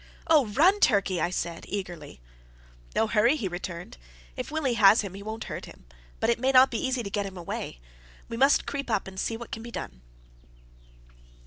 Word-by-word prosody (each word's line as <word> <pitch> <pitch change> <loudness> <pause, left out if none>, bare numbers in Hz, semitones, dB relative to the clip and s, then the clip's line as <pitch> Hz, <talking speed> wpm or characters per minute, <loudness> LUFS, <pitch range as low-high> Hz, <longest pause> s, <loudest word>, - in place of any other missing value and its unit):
"Oh, 310 -7 +4
run, 340 - +4
Turkey!" 200 - +3
I - - +1
said, 170 -2 -4
eagerly. 175 - -6 0.8
"No - - +3
hurry," 225 +5 +3
he 230 -10 -2
returned. 175 - -6 0.4
"If - - -5
Willie 300 -5 0
has 210 -1 +6
him, 200 -3 -6
he 195 - -8
won't 220 +2 -5
hurt - - -6
him, - - -15 0.3
but 225 - +2
it 235 - -1
mayn't 260 +1 +5
be 230 - -2
easy 260 -2 -1
to 200 - -5
get 205 -1 -1
him 190 -1 -9
away. 170 - -5 0.5
We 230 - -5
must 275 +4 +4
creep 280 -2 -4
up 215 -4 0
and 190 0 -8
see 225 - -2
what 235 0 -10
can 225 - -5
be 235 - -8
done." - - -7
220 Hz, 195 wpm, -27 LUFS, 190-255 Hz, 0.8 s, has